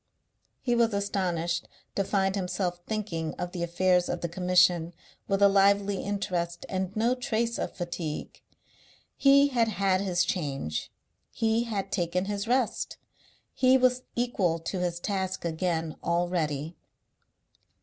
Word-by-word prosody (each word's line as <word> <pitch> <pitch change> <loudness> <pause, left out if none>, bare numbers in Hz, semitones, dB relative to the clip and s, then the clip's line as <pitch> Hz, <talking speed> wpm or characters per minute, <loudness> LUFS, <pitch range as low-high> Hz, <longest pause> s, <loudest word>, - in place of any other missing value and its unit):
He 245 - +1
was 230 -3 +3
astonished 175 -4 -1 0.3
to 195 - +1
find 195 -1 +1
himself 180 -2 -2
thinking 180 -8 -3
of 175 0 -4
the 175 - -5
affairs 180 +1 +2
of 175 - -2
the 170 - -1
Commission 180 -1 +3 0.3
with 195 0 +2
a - - +9
lively 200 0 +3
interest 180 -4 -2
and 190 +1 -2
no 230 +3 +2
trace 235 -3 -1
of - - -3
fatigue. 170 -3 -5 0.7
He 280 +1 +5
had 235 -4 +2
had 195 -3 +1
his 180 -3 +1
change; 135 - -3 0.4
he 225 +1 +1
had 205 -4 -3
taken 180 0 0
his 205 +1 -3
rest; 250 -1 0 0.6
he 260 0 +5
was 255 0 +3
equal 210 -9 +1 0.2
to 185 - -1
his 175 -1 -1
task 190 -1 -2
again 165 -1 -1
already. 170 -3 -1
185 Hz, 135 wpm, -28 LUFS, 175-215 Hz, 0.7 s, a